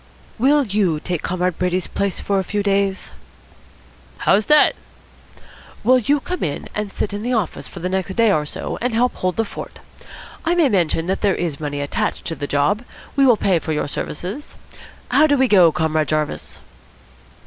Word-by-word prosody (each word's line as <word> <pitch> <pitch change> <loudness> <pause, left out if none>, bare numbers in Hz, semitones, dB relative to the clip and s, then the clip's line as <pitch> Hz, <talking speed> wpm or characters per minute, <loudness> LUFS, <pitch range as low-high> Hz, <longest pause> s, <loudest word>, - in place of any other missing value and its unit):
"Will 285 +4 +4
you 195 -7 +1
take 175 0 -3
Comrade 180 -1 -1
Brady's 180 0 0
place 200 -1 -2
for 200 -1 0
a - - -1
few 205 +2 -2
days?" 195 -1 0 1.1
"How's 210 +2 +2
that?" 300 0 +6 1.1
"Will 255 +3 +5
you 285 +5 +2
come 360 +5 -5
in 145 - -3
and 210 -1 -3
sit 205 - -3
in 205 - -4
the 245 +3 -1
office 210 -8 -2
for 175 - -10
the 180 - -1
next 190 0 -2
day 230 -2 +4
or 155 -5 +2
so 150 - -5
and 245 -1 -1
help 245 +2 +2
hold 185 -2 -2
the 225 - 0
fort? - - -8 0.7
I 340 +2 +1
may 330 -6 +4
mention 170 -5 +1
that 190 +2 -2
there 200 -3 +2
is 165 -5 -3
money 145 -2 -3
attached 145 - -2
to 165 - -2
the 145 -1 -4
job. 145 +10 +1 0.3
We 275 -1 +5
will 240 -3 +5
pay 185 -4 +2
for 160 - -3
your 150 - -1
services. 185 - -5 0.6
How 310 - +5
do 290 -1 +3
we 265 0 +3
go, 185 -7 +6
Comrade 155 -1 0
Jarvis?" 155 -1 -3
195 Hz, 190 wpm, -20 LUFS, 165-230 Hz, 1.1 s, that